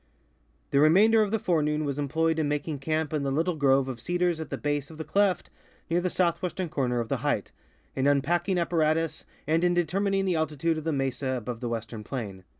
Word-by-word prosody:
The 140 - +3
remainder 205 +9 +6
of 210 - +1
the 225 - +1
forenoon 155 -5 0
was 140 0 -2
employed 160 +3 0
in 155 - +1
making 150 0 -2
camp 155 +2 -1
in 150 - 0
the 140 - -1
little 165 +6 0
grove 135 -2 +3
of 130 -3 -5
cedars 175 +5 0
at 160 - -6
the - - -3
base 145 -1 -2
of 160 - -11
the 160 - -4
cleft 195 +4 +1 0.4
near 175 +1 +2
the 180 - 0
south 170 -2 +1
western 180 -1 -3
corner 125 -5 0
of 115 - -2
the - - -1
height, - - -1 0.4
in 135 +1 +1
unpacking 170 +7 +2
apparatus, 165 -2 0 0.2
and 160 +2 +1
in 175 0 +3
de 175 -1 +2
termining 195 +3 0
the 185 -2 +1
altitude 160 +1 0
of 155 - -10
the 165 - +1
mesa 135 -1 -1
above 120 0 -5
the 120 -1 -3
western 115 -1 -5
plain. 105 -6 -6
155 Hz, 220 wpm, -27 LUFS, 135-175 Hz, 0.4 s, remainder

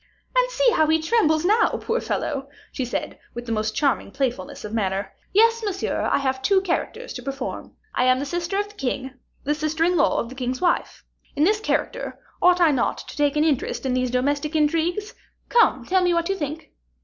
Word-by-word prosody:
"And - - +3
see - - +3
how 315 -10 +3
he 320 +1 +3
trembles 315 -2 +2
now, 430 +5 +4
poor 470 +2 -1
fellow," 275 -1 -3 0.2
she 260 - -3
said, 245 - -4 0.2
with 240 0 -5
the 230 - -5
most 215 -1 -1
charming 275 -6 +1
playfulness 245 -6 -3
of 210 - -7
manner. 195 -2 -1 0.2
"Yes, 460 +3 +4
monsieur, 390 -3 -1
I - - +4
have 265 -1 -1
two 385 +8 +4
characters 415 +6 -3
to 245 - -6
perform. 275 +1 -5 0.2
I 250 - +2
am 255 0 +4
the 275 - -3
sister 345 +5 -2
of 410 0 0
the 415 - -15
king, 265 -5 -3 0.3
the 290 - +1
sister 310 +1 -1
in 355 +2 +3
law 310 - +3
of 230 - -3
the - - -8
king's 255 -1 -3
wife. 350 -1 0 0.3
In 290 - +2
this 415 +5 +3
character 435 - -2 0.2
ought 360 0 +5
I 335 -3 +5
not 260 -4 0
to - - -9
take 290 -1 +1
an 300 - +3
interest 290 -3 0
in 260 - +1
these 255 0 +1
domestic 285 +5 0
intrigues? 335 +7 +1 0.4
Come, 475 -1 +3
tell 375 0 +2
me 350 -1 +3
what 335 +1 0
you 390 - +1
think?" 310 -1 -5
305 Hz, 210 wpm, -23 LUFS, 260-365 Hz, 0.4 s, ought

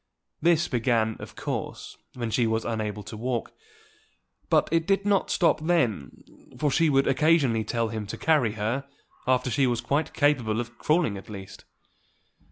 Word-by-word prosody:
This 170 0 +3
began, 115 -3 +1
of - - -10
course, - - -5 0.2
when 120 -3 -3
she 115 +1 +2
was 110 0 -1
unable 105 -2 -3
to 110 - -8
walk; 120 +1 -3 1.0
but - - +3
it 165 0 +1
did 195 0 +2
not 200 -2 +2
stop 170 -3 +2
then, 140 - 0 0.3
for 150 -2 +1
she 165 +3 +3
would 135 -1 +3
occasionally 135 -6 +3
tell 115 0 -1
him 110 -2 -5
to - - -6
carry 145 -9 +2
her 115 +6 -2 0.4
after 125 -1 +2
she 135 +2 +2
was 120 -1 0
quite 140 +6 -1
capable 125 -7 +2
of 120 0 -5
crawling 150 - +1
at - - -15
least. 95 -3 -9
125 Hz, 165 wpm, -26 LUFS, 110-155 Hz, 1.0 s, This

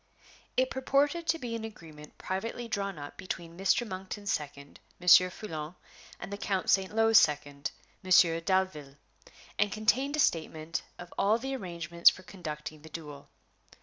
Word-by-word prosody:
It 255 0 +2
purported 285 +5 +1
to 325 +1 +2
be 240 -6 -5
an 225 - -5
agreement 160 -8 -11
privately 230 +5 -4
drawn 200 -4 -3
up 145 0 -9
between 170 -2 -6
Mr. 195 +6 +1
Monkton's 190 +1 -5
second, 140 -1 -6 0.2
Monsieur 180 +1 +7
Foulon, 160 -4 -7 0.4
and 180 +3 -7
the 200 - -5
Count 195 -3 0
St. 190 -1 +2
Lo's 225 -1 +7
second, 145 -2 0 0.3
Monsieur 170 -3 +5
Dalville, 165 -7 -1 0.6
and 205 0 +2
contained 245 +7 +1
a - - -3
statement 160 - 0 0.2
of 175 0 -10
all 210 +3 +4
the 270 +3 -4
arrangements 170 -5 +3
for 185 - -9
conducting 155 -5 -7
the 160 - -12
duel. 150 -4 -9
185 Hz, 150 wpm, -30 LUFS, 160-220 Hz, 0.6 s, Monsieur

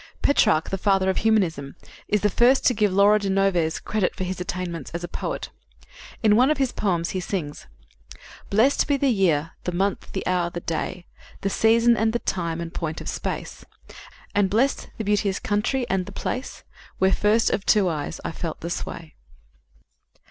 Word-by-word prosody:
Petrarch, 160 - +3
the 195 - -2
father 190 -1 +2
of - - -5
humanism, 175 -11 +1 0.3
is 210 -1 +1
the 210 - +3
first 250 +6 +4
to 250 - +5
give 210 -3 +1
Laura 200 +2 +5
de 200 -1 -2
Noves 190 -4 +1
credit 210 -4 -1
for 190 - -3
his 185 0 -4
attainments 175 -4 -4
as 170 - -4
a - - -3
poet. - - -4 0.7
In 210 -1 +5
one 255 +5 +5
of 305 - +2
his 265 -3 +1
poems 175 -5 -1
he 190 - -2
sings: 175 -5 -5 0.8
"Blest 230 +8 +3
be 285 -2 +2
the 275 -1 +2
year, 165 -7 +1
the 180 - -2
month, 195 +3 -2
the 190 - -3
hour, 180 -1 +1
the 175 - -5
day, 170 +2 -4 0.4
The 195 - -1
season 230 +3 +4
and 220 0 +1
the - - +2
time, 170 -7 -2
and 170 0 -6
point 160 -2 -4
of - - -8
space, - - -5 0.7
And 205 -2 +2
blest 240 +8 +1
the 220 - -3
beauteous 205 -1 +1
country 220 +5 -1
and 190 -4 -1
the - - -7
place 255 +2 -5 0.3
Where 190 0 +3
first 215 +2 +2
of 195 - -1
two 205 -3 +3
eyes 160 -1 -3
I - - -2
felt 165 -1 -5
the 170 - -4
sway." 165 -2 -6
195 Hz, 185 wpm, -24 LUFS, 175-215 Hz, 0.8 s, to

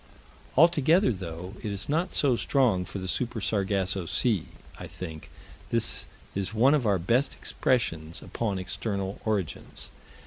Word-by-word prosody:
Altogether, 165 +2 +5
though 90 0 -6
it 105 - -3
is 100 0 -4
not 165 +5 +1
so 135 -4 +3
strong 115 -8 +2
for 95 - -6
the 95 -1 -4
Super 120 +3 -1
Sargasso 95 -3 0
Sea, 110 -4 +1 0.3
I - - -6
think 80 -4 -8 0.4
this - - +1 0.3
is 100 +2 -3
one 130 +6 +5
of 135 -7 +2
our 100 -2 +4
best 120 +10 +1
expressions 85 -10 -1
upon 105 -5 -2
external 95 +1 -3
origins. 105 -6 -2
100 Hz, 140 wpm, -28 LUFS, 95-125 Hz, 0.4 s, Altogether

